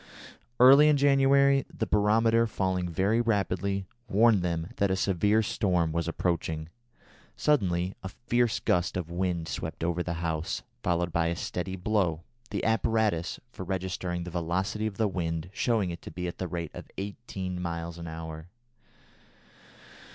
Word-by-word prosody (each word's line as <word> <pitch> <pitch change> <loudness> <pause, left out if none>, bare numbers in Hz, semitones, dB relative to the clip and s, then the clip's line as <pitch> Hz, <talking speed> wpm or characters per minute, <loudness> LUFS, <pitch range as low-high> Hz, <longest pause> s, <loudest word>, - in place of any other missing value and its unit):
Early 135 +4 +8
in 150 - +4
January 140 0 +4
the - - -2
barometer, 115 +2 +3
falling 95 -4 -1
very 100 +7 +2
rapidly, 100 -3 0 0.2
warned 110 -1 +4
them 85 -1 -2
that 100 - +2
a 95 - +2
severe 100 +3 +2
storm 90 -6 +1
was 85 +1 -1
approaching. 80 -2 -2 0.7
Suddenly 95 - +1
a 95 - -5
fierce 120 +2 0
gust 90 +1 +1
of 85 -2 -4
wind 85 -2 -1
swept - - -5
over 85 +1 0
the 85 -1 -3
house, 80 -1 -2 0.2
followed 85 -1 0
by 85 0 +2
a 85 - -1
steady 90 +2 -4
blow, 90 -4 0 0.3
the 100 - -3
apparatus 110 -5 +1
for 95 - -7
registering 90 -1 -3
the 90 - -7
velocity 95 +5 -1
of 100 -2 -6
the 110 - +2
wind 85 -2 -3
showing 110 -7 +1
it 85 - -7
to - - -8
be 90 0 -4
at 85 - -6
the 95 - -2
rate 85 -2 -4
of - - -9
eighteen 95 -3 -5
miles 85 -1 -4
an 85 - -6
hour. 80 0 -7
95 Hz, 155 wpm, -28 LUFS, 85-110 Hz, 0.7 s, Early